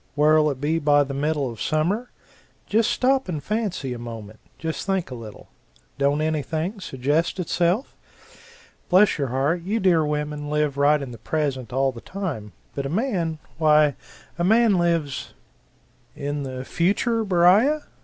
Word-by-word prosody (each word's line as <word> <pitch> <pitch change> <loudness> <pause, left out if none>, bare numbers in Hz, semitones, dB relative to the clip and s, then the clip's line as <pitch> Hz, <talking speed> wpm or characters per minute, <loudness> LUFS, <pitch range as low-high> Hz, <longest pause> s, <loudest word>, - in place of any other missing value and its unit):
Where'll 150 +1 +4
it 135 -3 -4
be 155 +3 0
by 145 -1 +4
the 135 0 -6
middle 145 0 0
of 115 - -10
summer? 185 +11 0 0.6
Just 220 +1 +2
stop 265 -4 +1
and 155 -5 -3
fancy 195 - -2
a 120 - -7
moment 110 -2 -8 0.2
just 160 -1 -4
think 190 -7 -1
a - - -4
little 115 -4 -10 0.5
don't 140 +2 +2
anything 160 +5 -2
suggest 150 +3 -1
itself? 180 - 0 0.9
Bless 185 -1 +4
your 140 - 0
heart, 140 +7 0
you 205 +6 -1
dear 175 -5 +3
women 150 0 -3
live 150 -2 0
right 145 +1 +4
in 130 - -7
the 115 - -10
present 135 -2 -2
all 135 +1 +1
the 120 -2 -11
time 155 - -5 0.2
but 140 -1 -3
a - - -5
man, 175 - -1 0.2
why 150 -2 +5 0.5
a - - +1
man 220 0 +4
lives 165 -5 -1 0.8
"In 145 +1 -3
the 130 -1 -5
future, 210 - +1
Beriah? 200 - +4
155 Hz, 155 wpm, -23 LUFS, 140-185 Hz, 0.9 s, why